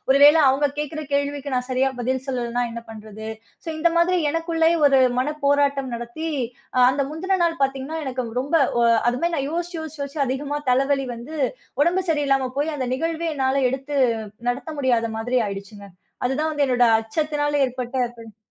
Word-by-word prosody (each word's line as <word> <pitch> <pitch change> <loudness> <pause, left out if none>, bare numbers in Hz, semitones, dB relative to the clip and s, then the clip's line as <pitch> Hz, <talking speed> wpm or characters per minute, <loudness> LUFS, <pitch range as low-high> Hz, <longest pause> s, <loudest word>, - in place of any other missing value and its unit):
ஒரு 275 - +6
வேளை 305 +2 +8
அவுங்க 275 +2 +3
கேக்கிற 300 +1 -3
கேள்விக்கு 285 -1 -1
நான் 250 0 -1
சரியா 260 +1 +2
பதில் 260 +2 -1
சொல்லலன்னா, 245 -2 -1
என்ன 235 - -5
பண்றது? 220 0 -9 0.4
சோ - - -7
இந்த 340 +2 +4
மாதிரி 355 +2 +3
எனக்குள்ளேயே 330 0 +1
ஒரு 275 -1 +5 0.2
மனப்போராட்டம் 280 -1 +1
நடத்தி 240 +7 -5 0.5
அ - - +3
அந்த 275 +2 0
முந்தின 375 +4 -1
நாள் 330 -3 -1
பாத்தீங்கன்னா, 270 +4 -1
எனக்கு 260 -1 -3 0.2
ரொம்ப 280 +5 -3 0.2
ஒ - - +3 0.3
அது 245 - +1
மாரி 340 0 0
நான் 275 -1 -1
யோசிச்சி 345 +2 -3
யோசிச்சி 315 -1 -8
யோசிச்சி 280 +1 -3
அதிகமா 280 +3 -2
தலைவலி 270 +1 +2
வந்து, 245 +7 -8 0.5
உடம்பு 360 +4 +2
சரியில்லாம 275 -4 +1
போயி, 300 +3 +1
அந்த 255 -3 -2
நிகழ்வே 330 +3 -2
என்னால 265 0 +1
எடுத்து 270 +2 -4 0.5
நடத்த 250 +5 -2
முடியாத 240 -4 +2
மாதிரி 245 +3 0
ஆயிடுச்சுங்க. 200 +1 -7 0.4
அது 265 - -1
தான் 315 +1 0
வந்து 290 -2 +1
என்னோட 245 -1 +3 0.2
அச்சத்தினால 290 +5 -1
ஏற்பட்ட 250 0 -5 0.2
பின் 225 -3 -12
275 Hz, 170 wpm, -23 LUFS, 250-305 Hz, 0.5 s, வேளை